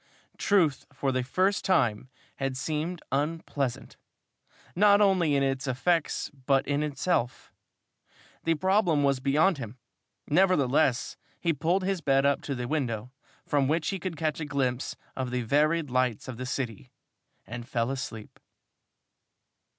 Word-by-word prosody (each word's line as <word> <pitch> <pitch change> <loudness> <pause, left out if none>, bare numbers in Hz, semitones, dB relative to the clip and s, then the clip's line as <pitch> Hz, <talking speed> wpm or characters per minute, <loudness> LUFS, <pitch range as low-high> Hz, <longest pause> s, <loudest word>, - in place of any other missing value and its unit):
Truth 170 -9 +2
for 135 0 -1
the 130 0 0
first 185 +11 +1
time 130 - +1 0.3
had 135 -1 -2
seemed 160 +5 -3
unpleasant, 145 -2 -2 0.8
not 205 +2 +6
only 185 -7 +3
in 140 - +2
its 135 0 -1
effects 160 +6 0
but 135 -1 0
in 145 +1 +1
itself. 150 -3 -1 0.9
The 165 0 +2
problem 180 -3 +2
was 140 -2 +2
beyond 150 +6 +2
him. 115 0 -7 0.5
Nevertheless, 145 -7 +2 0.2
he 170 -1 +1
pulled 170 +6 0
his 190 -2 -1
bed 135 -1 +3
up 140 0 +2
to 140 - -4
the 125 -1 -4
window, 125 -5 -2 0.3
from 140 -3 +1
which 160 +3 0
he 195 - -2
could 175 -2 -5
catch 155 -1 -1
a 155 - -3
glimpse 135 -3 -1 0.2
of 130 -1 -3
the 125 0 -2
varied 150 +4 +2
lights 125 -3 0
of 130 -3 -6
the 130 +1 -5
city, 125 -2 -4 0.6
and 120 0 -7
fell 115 +1 0
asleep. 115 -5 -6
140 Hz, 145 wpm, -28 LUFS, 130-165 Hz, 0.9 s, not